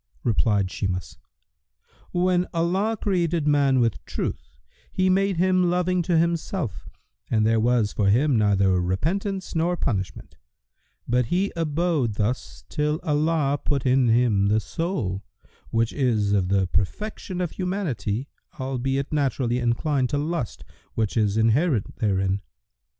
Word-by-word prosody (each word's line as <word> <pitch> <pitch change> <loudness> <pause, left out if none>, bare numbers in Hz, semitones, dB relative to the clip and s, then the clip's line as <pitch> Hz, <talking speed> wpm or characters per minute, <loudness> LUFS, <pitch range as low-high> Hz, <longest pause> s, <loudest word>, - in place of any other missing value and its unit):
Replied 105 -4 +1
Shimas, 95 -2 -4 0.9
"When 180 0 +2
Allah 190 +7 +1
created 170 -5 0
man 140 -3 +3
with 115 -3 0
Truth, - - -5 0.3
He 185 0 +2
made 195 -1 +2
him 185 0 +3
loving 180 +1 +1
to 170 0 +1
Himself 170 - -1 0.4
and 110 -2 +2
there 115 0 +3
was 115 -2 +2
for 100 -2 +2
him 130 +6 +3
neither 100 -4 +3
repentance 185 - -2
nor 170 +2 +1
punishment; 95 - -3 0.7
but 125 0 +1
he 190 - 0
abode 160 - 0
thus 85 - -3
till 150 - -1
Allah 150 -2 +1
put 140 -3 -1
in 130 0 +4
him 115 -4 +3
the 105 +2 +3
soul, 110 - -3 0.5
which 115 0 0
is 110 -7 +1
of 95 -3 +1
the 95 -1 +2
perfection 180 - -3
of 180 -3 -1
humanity, 140 - -2 0.3
albeit 135 +2 -2
naturally 130 -4 0
inclined 125 +2 0
to 145 - 0
lust 150 - -3 0.3
which 110 -3 -1
is 105 -2 +1
inherent 115 - +1
therein. 95 -2 0
135 Hz, 130 wpm, -24 LUFS, 105-170 Hz, 0.9 s, in